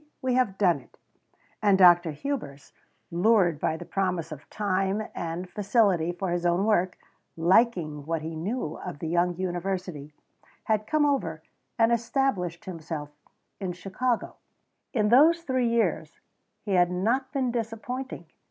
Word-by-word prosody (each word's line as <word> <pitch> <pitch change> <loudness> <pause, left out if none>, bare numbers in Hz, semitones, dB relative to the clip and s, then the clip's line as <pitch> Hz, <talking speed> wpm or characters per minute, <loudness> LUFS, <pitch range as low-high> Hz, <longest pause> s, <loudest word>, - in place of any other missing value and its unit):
We 260 -2 0
have 245 -7 +1
done 185 -4 +3
it!" - - -22 0.6
And 200 -3 +4
Dr. 175 -2 +6
Hubers, 145 - -5 0.4
lured 175 -3 +3
by 160 - 0
the 175 - -9
promise 180 -4 -2
of 150 -1 -10
time 195 0 0
and 170 +2 -4
facility 200 -4 +2
for 180 +1 -3
his 175 0 -1
own 175 +3 +2
work, 185 -4 +1 0.4
liking 165 -5 +2
what 165 -1 -2
he 160 0 -5
knew 175 0 -3
of - - -6
the 160 - -5
young 175 +2 +1
university, 180 -4 -4 0.5
had 215 -1 0
come 305 -1 +2
over 165 - -1 0.3
and 225 0 +4
established 230 - 0
himself 160 -4 -6 0.5
in 185 -3 -3
Chicago. 215 +7 -2 0.5
In 210 -5 +1
those 320 +8 +5
three 260 -5 0
years 230 -1 0 0.4
he 205 - -4
had 175 -2 +4
not 230 +9 0
been 265 -4 0
disappointing. 235 +3 -4
190 Hz, 145 wpm, -27 LUFS, 170-230 Hz, 0.6 s, Dr